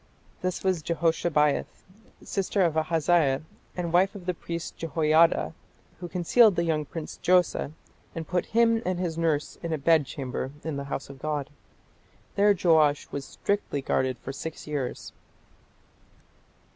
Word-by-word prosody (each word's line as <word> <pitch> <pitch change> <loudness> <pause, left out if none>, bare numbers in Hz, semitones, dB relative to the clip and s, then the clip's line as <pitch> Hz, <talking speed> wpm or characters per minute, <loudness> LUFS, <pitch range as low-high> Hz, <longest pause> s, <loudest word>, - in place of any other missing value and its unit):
This 185 -1 -2
was 185 -4 +1
Jehoshabeath, 160 -2 0 0.4
sister 195 0 0
of 165 -3 +1
Ahaziah 160 -3 +2 0.3
and 170 -2 -2
wife 190 +3 +3
of 190 -3 -9
the 180 - 0
priest 170 0 -6
Jehoiada, 160 +1 +2 0.5
who 175 - -5
concealed 190 +5 +4
the 170 - +1
young 155 -3 0
prince 160 +1 -7
Joash 180 -1 +5 0.6
"and 165 -1 -5
put 180 -1 -1
him 230 0 +3
and 185 -1 -1
his 175 -3 -2
nurse 160 -3 -1
in 170 - -4
a 160 - 0
bedchamber", 140 -3 0
in 155 -3 -3
"the 140 - -4
house 140 0 -5
of 135 - -13
God". 150 -1 -3 0.8
There 205 0 +4
Joash 155 -5 +3
was 140 -1 -4
strictly 200 -9 -2
guarded 130 -1 0
for 135 +3 -7
six 155 +4 -7
years. 145 -4 -4
165 Hz, 145 wpm, -27 LUFS, 150-180 Hz, 0.8 s, Joash